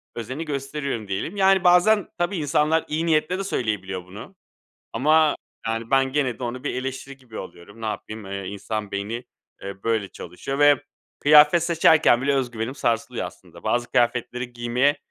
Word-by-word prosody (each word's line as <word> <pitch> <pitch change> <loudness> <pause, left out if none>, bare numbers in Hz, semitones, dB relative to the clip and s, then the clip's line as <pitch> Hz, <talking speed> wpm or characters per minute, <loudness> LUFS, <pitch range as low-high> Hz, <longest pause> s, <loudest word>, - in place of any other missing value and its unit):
özeni 130 +7 -5
gösteriyorum 140 -5 -4
diyelim. 100 - -3
Yani, 190 -1 +4
bazen, 180 +3 +5
tabii 175 +3 -1
insanlar 155 +1 +1
iyi 160 +2 -1
niyetle 165 +3 +1
de - - -2
söyleyebiliyor 100 - -3
bunu. 105 - -11 0.6
Ama, 155 +4 +3 0.3
yani, 115 0 -3
ben 135 -1 +3
gene 135 -5 0
de 125 - -4
onu 125 +1 -5
bir - - -2
eleştiri 135 +1 -5
gibi 125 -5 -11
alıyorum. 90 +6 -11
Ne 110 - -4
yapayım? 110 0 -6
Eee, 100 0 -5
insan 105 +1 -4
beyni, 105 +5 -4 0.4
eee, 100 0 -8
böyle 110 -3 0
çalışıyor 90 +13 -6
ve 145 -2 +5 0.4
kıyafet 150 +3 +7
seçerken 160 -6 +4
bile 140 +1 +2
öz 130 -3 0
güvenim 115 +2 -4
sarsılıyor 115 -5 -1
aslında. - - -14
Bazı 120 0 -1
kıyafetleri 125 +1 0
giymeye 120 +4 +1
130 Hz, 165 wpm, -23 LUFS, 110-150 Hz, 0.6 s, kıyafet